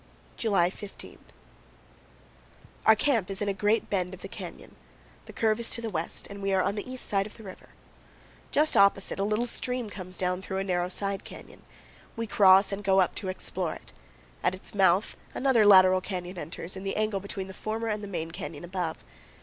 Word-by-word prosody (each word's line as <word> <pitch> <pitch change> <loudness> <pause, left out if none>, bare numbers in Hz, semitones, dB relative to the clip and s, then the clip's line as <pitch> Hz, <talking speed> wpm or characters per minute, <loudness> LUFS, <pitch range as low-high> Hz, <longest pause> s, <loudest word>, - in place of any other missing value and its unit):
July 195 -6 +2
15. 205 0 -10 1.7
Our 220 - +9
camp 225 -5 +1
is 195 -1 -3
in 205 - -1
a 200 - +1
great 205 +3 +1
bend 185 -2 -1
of 185 - -16
the - - -5
canyon. - - -9 0.5
The - - -8
curve 220 0 +1
is 235 - 0
to - - -1
the 225 -2 -4
west 165 -2 -4
and 200 0 -9
we 195 0 0
are 190 -1 +3
on 200 - 0
the 210 +5 -5
east 255 - -5
side 195 0 0
of - - -14
the 225 - -12
river. 190 -2 -11 0.8
Just 305 +2 +2
opposite, 200 -1 +4
a - - +1
little 215 +3 +1
stream 245 -2 -2
comes 185 -3 -7
down 180 0 -1
through 190 0 -4
a 195 - 0
narrow 180 -2 0
side 195 +1 -3
canyon. - - -12 0.5
We 230 - -2
cross 195 -2 +6
and 200 +1 -4
go 195 0 +4
up 185 - +3
to 195 - -3
explore 185 -2 -3
it. - - -13 0.5
At 180 - +1
its 185 - -7
mouth 190 0 +3 0.2
another 245 -6 +4
lateral 185 -2 +7
canyon 180 -1 -5
enters, 165 +4 -5
in 190 - -6
the 195 - -2
angle 215 -2 0
between 195 0 -5
the 190 - -9
former 220 +3 -3
and 210 -1 -2
the - - -5
main 165 -4 -4
canyon 165 -2 -7
above. 175 -2 -4
195 Hz, 205 wpm, -28 LUFS, 185-215 Hz, 1.7 s, Our